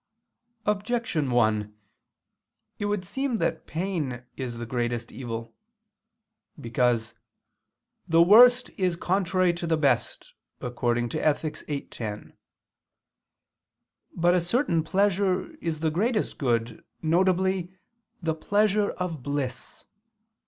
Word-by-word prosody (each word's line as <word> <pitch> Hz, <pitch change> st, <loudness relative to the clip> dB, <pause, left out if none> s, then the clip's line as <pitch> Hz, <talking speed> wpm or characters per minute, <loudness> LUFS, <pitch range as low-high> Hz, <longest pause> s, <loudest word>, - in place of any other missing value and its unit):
Objection 210 Hz, -, 0 dB
1: 110 Hz, -3 st, +1 dB, 1.0 s
It 205 Hz, -, -2 dB
would 205 Hz, -2 st, -1 dB
seem 260 Hz, +5 st, -2 dB
that 160 Hz, -6 st, -2 dB
pain 155 Hz, -8 st, -3 dB
is 125 Hz, -3 st, -5 dB
the 120 Hz, -, -5 dB
greatest 120 Hz, -1 st, -2 dB
evil. 115 Hz, -1 st, -6 dB, 1.1 s
Because 115 Hz, -1 st, 0 dB, 0.9 s
"the 165 Hz, 0 st, +4 dB
worst 245 Hz, +6 st, +7 dB
is 180 Hz, -2 st, +1 dB
contrary 185 Hz, 0 st, +1 dB
to 170 Hz, 0 st, -4 dB
the 165 Hz, -1 st, +2 dB
best" 135 Hz, -6 st, 0 dB, 0.3 s
(Ethic. 120 Hz, +5 st, -1 dB
viii, 145 Hz, -2 st, -2 dB
10). 105 Hz, -3 st, -7 dB, 1.8 s
But 175 Hz, +1 st, +3 dB
a 180 Hz, -, +3 dB
certain 175 Hz, -, +1 dB
pleasure 195 Hz, -, +1 dB
is 160 Hz, -, -4 dB
the 160 Hz, -1 st, +1 dB
greatest 210 Hz, +6 st, 0 dB
good, 115 Hz, -4 st, -1 dB, 0.2 s
viz. 185 Hz, +2 st, +2 dB, 0.6 s
the 160 Hz, -1 st, +1 dB
pleasure 205 Hz, +5 st, +1 dB
of 170 Hz, -6 st, -4 dB
bliss. 135 Hz, -2 st, -4 dB
165 Hz, 105 wpm, -26 LUFS, 120-190 Hz, 1.8 s, worst